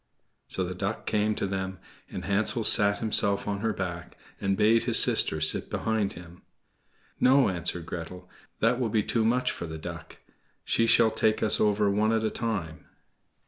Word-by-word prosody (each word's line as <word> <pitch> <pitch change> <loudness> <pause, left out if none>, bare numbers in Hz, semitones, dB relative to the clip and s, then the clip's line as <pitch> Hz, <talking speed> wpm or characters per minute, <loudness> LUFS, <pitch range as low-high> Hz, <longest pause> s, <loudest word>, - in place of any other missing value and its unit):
So 95 - +1
the 90 0 -4
Duck 95 +4 -4
came 105 0 0
to - - -3
them, 95 -1 -4 0.3
and - - -7
Hansel 105 +4 +1
sat 100 -1 +4
himself 100 -2 +1
on 100 -1 -2
her 110 +1 -1
back, 90 -3 -6 0.2
and 95 -1 -1
bade 110 +2 +3
his - - +4
sister 80 - +3
sit 80 0 +3
behind 110 -3 -2
him. 85 0 -13 0.8
"No," 130 -2 +4
answered 90 -1 -2
Gretel, 90 +2 -8 0.3
"that 120 +3 +2
will 120 -3 -1
be 105 -1 0
too 115 +2 -1
much 125 +3 +1
for 85 - -7
the 80 0 -7
Duck; 80 - -9 0.5
she 115 - +1
shall 115 -1 +4
take 110 0 0
us 110 - +3
over 105 0 +2
one 105 +2 +1
at 110 -1 0
a 110 - -1
time." 100 -9 -5
105 Hz, 180 wpm, -26 LUFS, 90-110 Hz, 0.8 s, sat